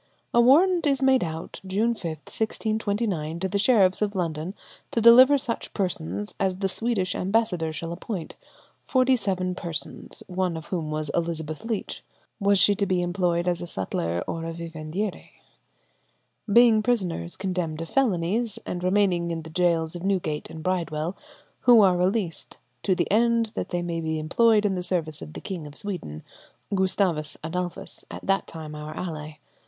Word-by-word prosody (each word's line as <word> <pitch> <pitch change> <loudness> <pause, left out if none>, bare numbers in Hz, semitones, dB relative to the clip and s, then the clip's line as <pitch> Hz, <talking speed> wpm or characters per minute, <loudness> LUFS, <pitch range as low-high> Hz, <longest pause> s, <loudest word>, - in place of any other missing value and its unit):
'" - - -44
A 240 - +6
warrant 335 +7 +5
is 275 -1 +1
made 265 -2 +4
out 160 -1 -6
June 205 +5 +1
5, 225 - -13 0.2
1629, 210 -7 -2
to 190 - -1
the 200 +2 -1
sheriffs 200 -4 +4
of 210 -1 0
London 165 +1 -2 0.3
to - - 0
deliver 250 +5 +8
to 265 - -6
such 230 - -4
persons 105 - -2
as 190 -2 +1
the 195 +1 -1
Swedish 195 -2 -1
ambassador 185 -5 0
shall 165 +1 -5
appoint, 180 -1 -5 0.5
forty 260 0 +3
seven 185 -5 -1
persons, 170 -4 -7
of 180 -3 -2
whom 170 -4 -3
one - - -4
was 155 -1 -2
Elizabeth 160 -2 -2
Leech 225 -3 -4 0.4
(was 200 -1 +3
she 205 - +5
to 200 0 -1
be 180 -1 +1
employed 175 -1 0
as 175 -1 0
a 175 - -5
sutler 85 - -2
or 165 - -3
vivandière?), 165 +4 -5 1.2
being 230 0 +6
prisoners 185 - -1
condemned 180 -5 -2
of 165 - -4
felonies, 215 -2 0
and 180 0 -4
remaining 185 -2 +2
in 165 -1 -3
the 160 - -10
gaols 165 -1 +1
of 175 - -6
Newgate 180 -6 -1
and 160 -1 -8
Bridewell, 170 -1 -1 0.4
who 240 -3 +7
are 190 -3 +5
released 180 -1 -1 0.2
"to 190 - +2
the 175 - +1
end 230 +1 +3
that - - -4
they 175 -1 -1
may 170 -1 -2
be 160 0 -2
employed 210 +7 +3
in 200 - +2
the 180 - -2
service 170 -4 -1
of 75 -2 -9
the - - -7
King 175 -6 -5
of 145 - -12
Sweden"—Gustavus 180 - -2
Adolphus, 175 +2 -5
at - - -8
that 195 0 +1
time 155 -2 -8
our 150 0 -7
ally. 155 -3 -5
180 Hz, 170 wpm, -25 LUFS, 165-210 Hz, 1.2 s, deliver